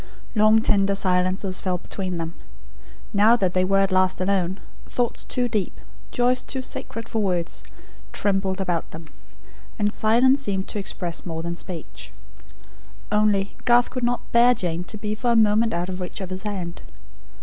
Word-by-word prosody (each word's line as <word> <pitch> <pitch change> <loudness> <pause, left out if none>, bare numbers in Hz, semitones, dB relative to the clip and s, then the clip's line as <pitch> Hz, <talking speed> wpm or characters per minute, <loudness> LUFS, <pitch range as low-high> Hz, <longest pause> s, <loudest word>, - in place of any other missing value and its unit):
Long 215 0 +5
tender 200 -2 +3
silences 185 0 +1
fell 185 -1 0
between 185 0 -4
them. 165 0 -4 0.8
Now 215 +3 +6
that 190 -6 0
they 185 - +2
were 195 +1 +3
at 195 0 +1
last 185 0 +2
alone, 185 0 0 0.3
thoughts 245 -2 -1
too 245 -1 -1
deep, 210 -5 -2 0.3
joys 250 0 +2
too 260 -1 -5
sacred 230 -2 -6
for 225 - -1
words, 180 -4 -1 0.5
trembled 195 -1 0
about 180 -3 -1
them; 160 0 -10 0.7
and 210 -1 +1
silence 250 +5 +4
seemed 195 -7 -2
to 210 - -3
express 180 -3 -4
more 165 -2 -4
than 170 0 -3
speech. 165 - -7 1.0
Only, 210 -2 +2
Garth 240 0 +4
could 255 - -4
not 240 0 0
bear 240 +1 +6
Jane 175 -4 -2
to 215 - -7
be 210 0 -3
for 235 +2 +1
a - - +1
moment 220 +1 +4
out 175 -1 -1
of 185 0 -5
reach 180 - -5
of 190 -2 -6
his 185 0 -4
hand. 185 -5 -5
195 Hz, 170 wpm, -24 LUFS, 185-220 Hz, 1.0 s, Now